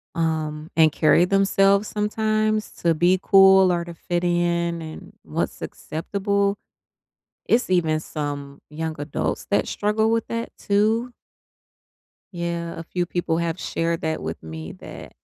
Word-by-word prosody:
um, 155 -1 -2
and 160 -1 +5
carry 155 +4 +4
themselves 195 +1 +3
sometimes 215 0 0
to 170 -2 0
be 180 +3 +3
cool 190 -1 +6
or 170 -1 -1
to 170 - -8
fit 175 +1 -3
in, 170 -1 0
and 155 0 -9
what's - - -3
acceptable. 200 +4 -2 0.9
It's 240 -1 +2
even 160 -4 +2
some 145 -3 -5
young 160 +1 -4
adults 145 0 -3
that 205 - +2
struggle 215 +2 +1
with 230 -1 0
that 230 0 -3
too. 220 +4 +1 1.2
Yeah, 170 -1 -4
a - - -6
few 175 +1 -2
people 170 -2 -1
have 170 +1 -2
shared 165 0 -2
that 160 0 -2
with 80 +1 -5
me 80 0 -7
that - - -11
175 Hz, 140 wpm, -23 LUFS, 160-200 Hz, 1.2 s, cool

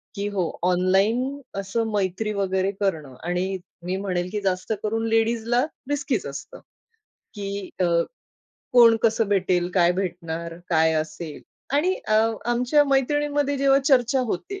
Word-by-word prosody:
की 200 +1 -2
हो, 190 -5 -1
ऑनलाईन 195 +10 +2 0.2
असं 225 +4 -1
मैत्री 205 +1 -1
वगैरे 190 -1 0
करणं 160 -10 -2
आणि 180 +2 -1 0.3
मी 185 +1 -1
म्हणेन 180 -2 -2
की 210 - -2
जास्त 190 +2 -1
करून 225 +1 -1
लेडीजला 230 +3 +2 0.2
रिस्कीच 275 -6 -1
असतं. 140 0 -8 0.8
की 200 -1 -5
अ, - - +3 0.9
कोण 235 -2 +7
कसं 225 -2 +2
भेटेल, 180 -3 +1
काय 175 -2 +4
भेटणार, 170 -3 -4
काय 160 -1 +3
असेल? 155 0 -4 0.3
आणि 350 +6 +2
अ, 215 - +3 0.3
आमच्या 245 +5 +3
मैत्रिणींमध्ये 285 +1 +1
जेव्हा 275 0 +4
चर्चा 260 -1 +3
होते. 390 - -4
200 Hz, 130 wpm, -24 LUFS, 180-245 Hz, 0.9 s, कोण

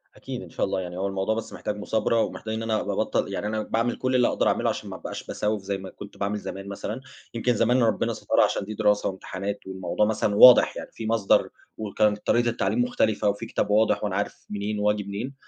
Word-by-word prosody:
أكيد - - -6
إن - - -10
شاء - - -1
الله - - -2
يعني 90 -1 -6
هو 95 +1 -1
الموضوع 95 +2 -1
بس 115 - -5
محتاج 105 - -4
مثابرة، 110 +2 +1
ومحتاج 110 0 -3
إن 110 +1 -3
أنا 110 -1 0
أبقى - - -3
أبطّل - - 0
يعني 105 - -2
أنا 110 0 -1
باعمِل 115 +2 0
كل 130 0 0
اللي 125 -1 +4
أقدر - - +1
أعمله - - +2
عشان - - -4
ما - - -6
أبقاش - - -7
بسوّف 105 -1 -1
زي 100 0 -2
ما 95 0 -8
كنت 100 - -11
باعمل 100 +1 -1
زمان 95 0 -7
مثلًا، 105 +4 -5 0.3
يمكن 120 +1 +1
زمان 120 +3 +3
ربنا 115 - +1
سترها - - +2
عشان - - 0
دي 110 - -6
دراسة 105 0 +2
وامتحانات 100 +1 -5
والموضوع 95 +2 -1
مثلًا 105 -1 0
واضح 125 +3 +8
يعني، - - -7
في 115 - -6
مصدر 110 -3 +3 0.3
وكانت 105 0 0
طريقة 120 0 +3
التعليم 120 - 0
مختلفة 110 - +1
وفي 100 +3 -3
كتاب 105 - -2
واضح 105 0 +3
وأنا 100 -3 -1
عارف 100 - -3
منين 105 +1 -3
وآجي 105 0 +1
منين، 100 +7 -5
105 Hz, 225 wpm, -25 LUFS, 100-115 Hz, 0.3 s, واضح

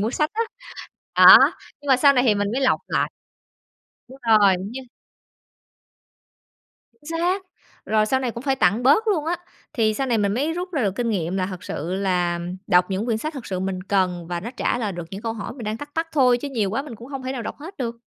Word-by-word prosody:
mua 215 +3 0
sách 300 +4 0
á. 450 - 0 0.7
Đó, - - +11 0.4
nhưng 290 - -10
mà 265 - +6
sau 280 +2 +6
này 250 -2 +2
thì 215 - +4
mình 205 0 -1
mới 260 - -1
lọc 260 -1 +2
lại. - - 0 1.0
Đúng 265 +2 -13
rồi! 205 -3 +6
Như 220 +8 -6 2.2
Chính 330 +2 -4
xác! 365 +3 0 0.4
Rồi 215 0 +2
sau 260 +4 +1
này 255 -2 -1
cũng 235 +1 -8
phải 270 -1 0
tặng 205 +2 +2
bớt 295 - +4
luôn 340 -8 +1
á, 340 +2 -1 0.4
thì 215 -2 +1
sau 270 +4 -2
này 235 -3 +1
mình 200 -1 +1
mới 290 +7 0
rút 360 +2 -5
ra 290 -6 0
được 195 -3 0
kinh 240 +2 -2
nghiệm 180 -3 -2
là 185 -1 0
thật 185 0 -8
sự 170 0 -4
là 180 -3 0 0.3
đọc 180 -1 +3
những 195 +4 -2
quyển 225 -3 0
sách 305 +7 -5
thật 265 -4 -7
sự 185 -1 -3
mình 190 -1 -3
cần 185 -3 0
và 175 0 -3
nó 225 +7 -6
trả - - 0
lời 215 -4 -2
được 175 -1 -6
những 195 +2 -7
câu 225 -1 -2
hỏi 220 -2 -6
mình 245 -3 -9
đang 215 +1 -2
thắc 290 +4 -9
mắc 325 0 -1
thôi 255 -4 +4
chứ 285 - -5
nhiều 220 -8 -1
quá 230 +7 -1
mình 285 -5 -9
cũng 235 +4 -12
hông 275 -2 -6
thể 260 0 -3
nào 255 -3 -4
đọc - - -6
hết 335 +7 -10
được. 235 -2 -4
230 Hz, 240 wpm, -23 LUFS, 195-275 Hz, 2.2 s, Đó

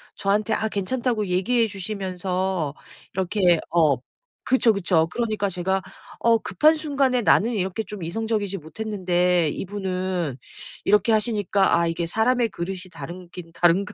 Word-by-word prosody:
저한테 210 +3 0
아 220 - 0
괜찮다고 220 +1 -1
얘기해 225 +6 +2
주시면서 185 -4 -3 0.4
이렇게 185 -2 +2
어 155 -5 +4 0.5
그쵸, 250 -3 +4
그쵸. 175 -4 +2
그러니까 215 -4 -1
제가 190 +1 -1 0.4
어 230 -1 +4
급한 310 +7 +3
순간에 275 -5 +1
나는 230 +1 +4
이렇게 190 0 -2
좀 205 -2 -8
이성적이지 205 +2 -2
못했는데 180 -1 0
이분은 185 -4 -3 0.5
이렇게 210 +2 +3
하시니까 205 -4 +2
'아 170 - +2
이게 165 +1 -2
사람의 230 +6 +1
그릇이 185 0 -4
다르기는 175 +2 -9
다른가 185 +5 +2
195 Hz, 325 characters per minute, -24 LUFS, 180-220 Hz, 0.5 s, 어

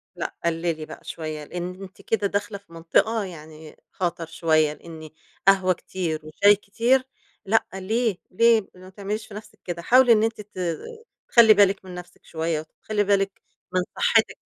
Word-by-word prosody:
لأ - - -5
قلِّلي 165 -1 -1
بقى - - -11
شوية، 155 -2 -6
لإن 180 +4 -6
أنتِ 190 0 -12
كده 210 -3 0
داخلة 205 +1 -2
في 200 -4 -21
منطقة 190 +7 +1
يعني 155 -3 -11
خطَر 170 -2 -2
شوية، 160 -2 +1
لإن 160 0 -11 0.4
قهوة 190 -1 +5
كتير 170 -3 -4
وشاي 200 +7 +4
كتير 235 +6 +1 0.4
لأ 225 +3 +2
ليه، 215 +2 -1
ليه؟ 225 +1 +4
ما 185 +1 -13
تعمليش 205 +3 -5
في - - -13
نفسِك 210 +1 -11
كده. 175 -1 -4
حاولي 250 +6 +5
إن 215 -1 +3
أنتِ 225 -1 -1
ت 205 -2 -12 0.7
تخلّي 230 -3 +8
بالِك 200 -1 +3
من 185 - -9
نفسِك 180 0 -12
شوية 160 -1 -2
وتخلّي 205 +7 -3
بالِك 195 -1 0 0.3
من 185 - +2 0.2
صحّتِك. 485 0 +3
190 Hz, 160 wpm, -24 LUFS, 165-210 Hz, 0.7 s, تخلّي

